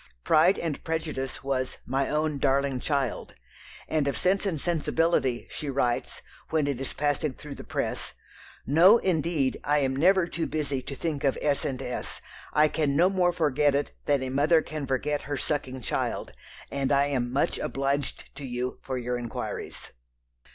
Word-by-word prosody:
Pride 170 - +5
and 160 -4 -3
Prejudice 155 -6 -3
was 130 -1 -1
"my 135 +2 0
own 150 -1 0
darling 135 -1 +2
child," 135 -4 -2 0.5
and 155 -3 +1
of 140 - 0
Sense 195 +2 +2
and 165 -6 -1
Sensibility 165 -5 +1
she 150 - -4
writes, 130 -3 -1 0.3
when 155 -2 +2
it 140 -2 -2
is 135 - -2
passing 145 0 0
through 150 -1 -8
the - - -9
press: - - -3 0.5
"No, 175 - +7
indeed, 165 - 0
I 145 +1 +2
am 135 -2 +1
never 185 +5 +4
too 170 -1 -3
busy 145 -4 -2
to 140 - -7
think 150 -1 -3
of 135 - +2
S. 145 -2 +1
and 130 -3 -2
S. 125 - -4 0.3
I 150 +1 +5
can 150 -2 0
no 175 +5 +5
more 180 -2 +3
forget 150 -4 +2
it 145 - 0 0.2
than 140 -2 +2
a 130 - -3
mother 150 +5 +3
can 155 -3 -5
forget 145 +3 0
her 145 - -1
sucking 130 -3 -2
child; - - -2 0.4
and 140 -1 -1
I 140 0 +4
am 125 -4 -1
much 135 - +1
obliged 140 0 -2
to 145 - -7
you 125 -1 -3
for 130 -1 -3
your 125 0 -2
inquiries." 120 -2 -5
145 Hz, 170 wpm, -27 LUFS, 135-155 Hz, 0.5 s, No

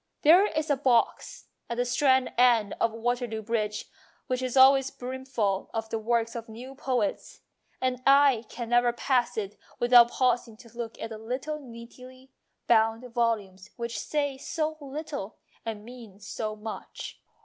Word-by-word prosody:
There 355 +7 +7
is 310 -3 -2
a - - +4
box 255 -4 0 0.2
at 235 - -3
the 245 - +1
Strand 260 +1 +2
end 235 -4 +4
of 230 - +3
Waterloo 230 -1 -2
Bridge 210 -1 -2 0.4
which 255 -1 -2
is 255 0 -2
always 270 0 +7
brimful 250 -7 -3
of 225 0 -3
the 225 - -1
works 230 +1 0
of 230 0 -6
new 245 +4 -9
poets, 250 -6 -2 0.4
and 255 -1 -1
I 275 -4 +5
can 235 -1 -6
never 240 0 +3
pass 245 0 0
it 205 -1 -4 0.2
without 240 -1 +7
pausing 240 -3 0
to 230 0 -17
look 235 -1 -6
at 225 - -6
the 220 - -7
little 255 +7 -4
neatly 255 +1 -13 0.3
bound 225 +1 +2
volumes 210 -6 -1
which 235 -3 -4
say 285 +1 -2
so 310 +2 -2
little 280 -6 -6 0.3
and 215 -2 -5
mean 230 -5 -12
so 215 +1 -5
much. 215 +1 -8
240 Hz, 155 wpm, -27 LUFS, 225-260 Hz, 0.4 s, There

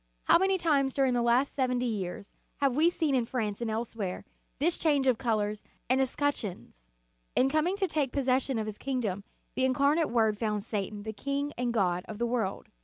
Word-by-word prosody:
How - - +5
many 385 +1 +2
times 285 -6 +1
during 270 -2 +3
the 240 - +1
last 240 +4 +2
seventy 250 -2 0
years 200 -4 -4 0.2
have 275 -3 +1
we 320 +4 +5
seen 320 -4 0
in 245 -3 +1
France 220 -4 -2
and 235 - -1
elsewhere, 220 -4 -3 0.3
this 330 +6 +1
change 290 -4 +2
of 255 -4 +3
colors 215 -3 -1 0.3
and 260 +1 +4
escutcheons! 230 - -3 0.5
In 265 - +4
coming 310 +6 +1
to 400 -1 +1
take 300 -6 -1
possession 265 -1 +1
of 220 - -1
His 215 -1 -6
kingdom, 230 -8 -2 0.3
the 260 - -1
Incarnate 280 +5 +3
Word 220 -3 +2
found 210 -3 -1
Satan 205 -1 -4
the 220 0 -5
king 280 +6 -2
and 245 0 -1
god 180 -5 +1
of 215 - -7
the 235 - 0
world. 230 -5 -2
250 Hz, 190 wpm, -29 LUFS, 215-280 Hz, 0.5 s, How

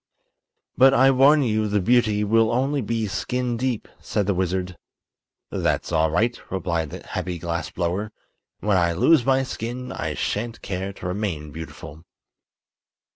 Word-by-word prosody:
"But 135 +1 +7
I 135 +1 +6
warn 140 +3 +5
you 110 -3 +1
the 105 0 +1
beauty 110 0 +2
will 115 +1 +3
only 135 +4 +1
be 115 0 -1
skin 125 +4 -2
deep," 125 -1 -2
said 105 - -1
the 100 - +1
wizard. 90 0 -2 0.8
"That's - - -1
all 80 +1 +3
right," 115 +10 +1
replied 85 -4 -2
the - - -9
happy 90 -2 -4
glass 85 -2 -3
blower; 95 +6 -2 0.5
"when 105 -2 +2
I 85 -1 +2
lose 130 - +4
my 135 +1 +3
skin 125 0 -5
I - - -3
shan't 115 +2 -3
care 95 +1 -3
to 100 - -11
remain 90 -6 -3
beautiful." 80 0 -9
105 Hz, 150 wpm, -23 LUFS, 90-120 Hz, 0.8 s, But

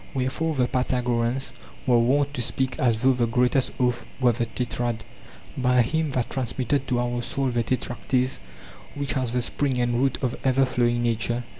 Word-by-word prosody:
Wherefore 140 +5 -1
the 125 -2 +2
Pythagoreans 125 0 0 0.3
were 120 -2 +4
wont 140 +4 +2
to 125 - -2
speak 125 +2 -1
as 115 -2 +2
though 130 0 +5
the 120 -2 +1
greatest 125 +2 +2
oath 125 -1 0
were 125 -2 +4
the 120 0 -2
tetrad: 120 -1 -3 0.5
'By 125 -1 +3
him 160 +5 0
that 125 -3 -2
transmitted 130 +1 -1
to 125 -2 +1
our 120 0 -1
soul 135 +2 -1
the 120 -1 +1
tetraktys, 125 +2 -1 0.6
which 140 -1 -1
has 130 -4 -1
the 125 -1 +1
spring 135 0 0
and 120 -1 +1
root 135 -1 +1
of 125 - 0
ever 135 0 +3
flowing 120 -1 +1
nature. 120 +1 0
125 Hz, 175 wpm, -25 LUFS, 120-130 Hz, 0.6 s, though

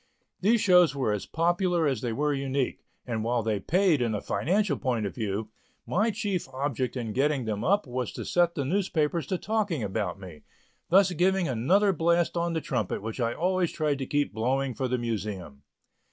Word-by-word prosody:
These 220 +4 +3
shows 180 -5 +5
were 130 -6 0
as 105 -1 -3
popular 175 +1 +1
as 135 -7 0
they 120 - -2
were 145 +5 0
unique, 135 -1 -2 0.2
and 115 -3 -2
while 120 0 0
they 110 -2 0
paid 175 - +2
in 115 -3 0
a - - -1
financial 170 - 0
point 120 -5 -1
of 100 - -4
view, 105 -1 -3 0.4
my 210 +5 +1
chief 205 -4 -2
object 130 -2 -2
in 115 -3 -3
getting 135 0 +1
them 105 -1 -2
up 200 +5 +2
was 125 -1 -3
to - - -6
set 175 -1 +2
the 140 - -2
newspapers 165 -3 0
to 185 - -1
talking 205 - -1
about 100 -2 -2
me, 85 -6 -11 0.5
thus 190 +1 +5
giving 180 +1 +2
another 180 - +3
blast 170 +1 +1
on 170 0 0
the 160 - -1
trumpet 120 -9 -2
which 110 +3 -5
I 115 -1 0
always 180 0 +1
tried 150 -3 -1
to 135 - -3
keep 145 -4 0
blowing 130 +4 0
for 130 +2 -2
the 125 0 0
Museum. 105 - -4
140 Hz, 195 wpm, -27 LUFS, 115-175 Hz, 0.5 s, shows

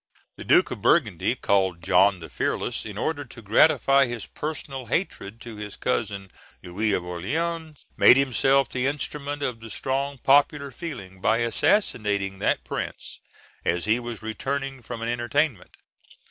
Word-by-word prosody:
The - - -9
Duke - - +4
of - - -5
Burgundy, - - +2
called 95 -4 +1
John 95 +1 +4
the 80 - -7
Fearless, - - -2
in - - -8
order 150 -2 -1
to 120 -2 -13
gratify 135 +4 +4
his 120 -3 -5
personal 135 -4 -6
hatred 115 - -2
to 115 -3 -9
his 105 -1 -7
cousin, 100 -6 -2 0.3
Louis 100 +5 -1
of 90 - 0
Orleans, 155 - -3
made 125 - +8
himself 135 0 +3
the 125 +1 -1
instrument 145 0 -3
of 125 -4 -2
the 115 0 -10
strong 135 +4 -2
popular 140 +2 +3
feeling 110 - -8
by 110 - +3
assassinating 105 - +1
that - - +1
prince - - -5 0.4
as 85 0 0
he 110 +3 +2
was 120 -2 -7
returning 135 +4 -3
from 115 0 -6
an - - -2
entertainment. 120 - -1
120 Hz, 150 wpm, -25 LUFS, 105-140 Hz, 0.4 s, made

